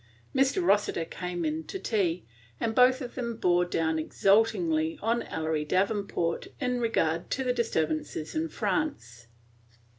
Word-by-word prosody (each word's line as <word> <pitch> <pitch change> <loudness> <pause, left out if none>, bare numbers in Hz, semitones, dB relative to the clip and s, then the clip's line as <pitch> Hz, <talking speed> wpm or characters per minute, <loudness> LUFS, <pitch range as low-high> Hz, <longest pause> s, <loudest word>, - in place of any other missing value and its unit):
Mr. 270 +7 +2
Rossiter 205 - +2
came 175 0 -4
in 155 +1 -1
to - - -5
tea, 190 - -1 0.3
and 225 - -1
both 255 +3 +5
of 245 -2 -6
them 235 -2 -3
bore 180 -3 +3
down 160 -2 0
exultingly 310 - +2
on 230 +2 0
Ellery 160 -1 -2
Davenport 185 0 0
in 250 -2 0
regard 170 -8 0
to 265 - -1
the 250 -1 +1
disturbances 160 -9 -1
in 320 +1 -1
France. 120 - -2
205 Hz, 140 wpm, -28 LUFS, 165-250 Hz, 0.3 s, both